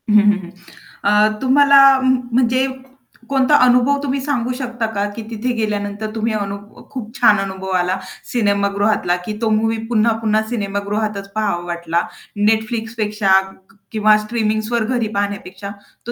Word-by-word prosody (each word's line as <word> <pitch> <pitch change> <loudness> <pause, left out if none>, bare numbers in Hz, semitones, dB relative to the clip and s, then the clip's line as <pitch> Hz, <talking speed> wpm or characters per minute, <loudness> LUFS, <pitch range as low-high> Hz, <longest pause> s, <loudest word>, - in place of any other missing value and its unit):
हं, 210 - +3
हं, 205 0 +3
हं. 175 - -9 0.5
अ, 210 +1 +4
तुम्हाला 280 +2 +5 0.3
म्हणजे 255 0 +1 0.6
कोणता 270 +1 +3
अनुभव 250 +3 +3
तुम्ही 275 -1 -1
सांगू 255 -3 -1
शकता 245 -2 -3
का 200 0 0
की 230 - -5
तिथे 230 +2 -2
गेल्यानंतर 210 -1 -3
तुम्ही 225 0 -1
अनु 200 -2 -3 0.3
खूप 230 -4 -7
छान 215 -4 +5
अनुभव 190 -1 -5
आला, 180 +2 -1 0.3
सिनेमागृहातला 200 -3 +1
की 210 -1 -5
तो 225 - +1
मूव्ही 225 +1 +1
पुन्हा-पुन्हा 220 -1 +1
सिनेमागृहातच 200 -1 -3
पाहावा 200 -5 -1
वाटला 170 -1 -1 0.5
Netflixपेक्षा 220 -2 -1 0.4
क - - -24 0.2
किंवा 215 -1 +4
स्ट्रीमिंग्सवर 220 +1 -1
घरी 235 -3 0
पाहण्यापेक्षा 200 -1 -4 0.4
तो - - -2
215 Hz, 135 wpm, -18 LUFS, 205-240 Hz, 0.6 s, तुम्हाला